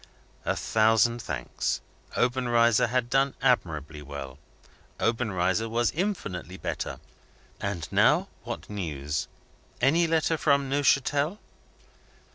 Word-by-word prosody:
A - - +1
thousand 115 +2 +3
thanks. - - -2 0.4
Obenreizer 120 -2 +3
had 125 +1 0
done 135 +2 +2
admirably 80 - 0
well; 70 -2 -8 0.6
Obenreizer 110 -2 0
was 120 +1 +1
infinitely 105 - -3
better. - - -4 0.6
And 100 -6 -3
now, - - +4 0.2
what - - -6
news? 75 -8 -3 0.5
Any 165 +7 +4
letter 160 0 +2
from 140 -2 +2
Neuchatel? 145 +4 +2
115 Hz, 95 wpm, -27 LUFS, 90-135 Hz, 0.6 s, now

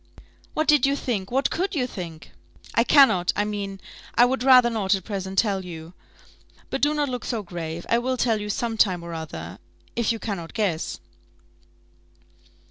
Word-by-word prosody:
"What 310 - 0
did 295 -2 +5
you 280 - +1
think? 210 -9 -3
What 270 +2 +1
could 370 +2 -1
you 260 -4 +1
think?" 170 -9 -8 0.4
"I 230 - +4
cannot 245 -11 +5
I 205 - +1
mean, 200 -2 -4 0.4
I 240 - +7
would 260 +1 -1
rather 250 -2 +6
not 205 -3 +1
at 190 - -6
present 190 -2 -5
tell 195 -2 +2
you. 165 -1 -9 0.8
But 270 - -2
do 295 +1 +3
not 295 -1 +1
look 250 -3 -4
so 230 -4 -3
grave; 170 -2 -6
I 235 - +3
will 255 +1 -1
tell 225 -3 +1
you 210 - -5
some 230 +1 -2
time 185 -5 +2
or 170 0 -7
other, 95 - -7 0.4
if 235 -1 +1
you 230 - -2
cannot 195 -7 -5
guess." 190 -8 -1
210 Hz, 180 wpm, -24 LUFS, 180-250 Hz, 0.8 s, I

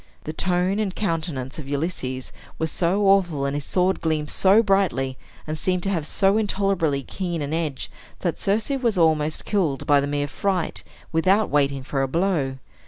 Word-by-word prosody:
The 155 - -5
tone 180 +4 +1
and 200 -4 -1
countenance 160 -8 -3
of 140 -2 -8
Ulysses 140 -4 -3 0.2
were 160 - 0
so 175 +5 0
awful, 175 -8 +3
and 140 - -1
his 145 - -3
sword 185 +1 +1
gleamed 155 -2 0
so 200 +4 +5
brightly, 190 - +1 0.3
and 155 - -3
seemed 180 +3 -1
to 195 - 0
have 165 -5 -1
so 195 +5 +3
intolerably 195 -9 0
keen 175 +3 -4
an 145 +2 -3
edge, 155 -5 -2 0.3
that - - -1
Circe 215 +6 0
was 245 -7 0
almost 155 -2 +2
killed 170 -10 0
by 145 -1 +5
the 140 - -2
mere 145 0 -1
fright, 185 +3 -1 0.3
without 190 +6 +2
waiting 140 -2 +1
for 135 0 -2
a 135 - +1
blow. 155 -4 0
165 Hz, 175 wpm, -23 LUFS, 145-195 Hz, 0.3 s, so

